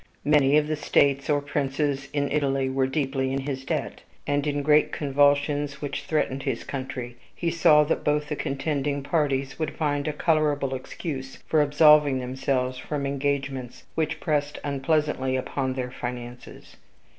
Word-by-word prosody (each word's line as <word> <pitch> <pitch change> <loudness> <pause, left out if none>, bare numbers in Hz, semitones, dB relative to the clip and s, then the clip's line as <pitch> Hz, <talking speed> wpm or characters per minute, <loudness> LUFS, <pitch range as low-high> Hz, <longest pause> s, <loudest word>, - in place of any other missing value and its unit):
Many 145 -1 +4
of 150 0 +2
the 155 - 0
states 140 -1 +2
or 145 -1 +2
princes 140 -1 -2
in 145 -1 -1
Italy 135 -2 +1
were 130 0 +1
deeply 135 -1 -1
in 135 +1 -1
his 135 -1 -4
debt; - - -3 0.2
and, 145 0 0
in 145 0 0
the - - 0
great 150 +1 +4
convulsions 145 0 +1
which 145 0 -4
threatened 140 -3 0
his 135 -4 -2
country, 125 -3 -6 0.2
he 170 -1 -1
saw 155 -2 +5
that 150 - -1
both 150 0 +1
the 150 - -2
contending 140 0 -2
parties 140 -2 -1
would 155 - -2
find 145 -2 0
a 155 - -1
colorable 150 -4 +1
excuse 135 +1 -6
for 155 - +3
absolving 150 -1 +5
themselves 130 0 -1
from 140 +1 -3
engagements 140 -2 -2
which 160 0 -1
pressed 145 -1 -1
unpleasantly 140 -1 0
upon 130 0 -2
their 125 -1 -3
finances. 120 -1 -8
140 Hz, 155 wpm, -25 LUFS, 135-150 Hz, 0.2 s, saw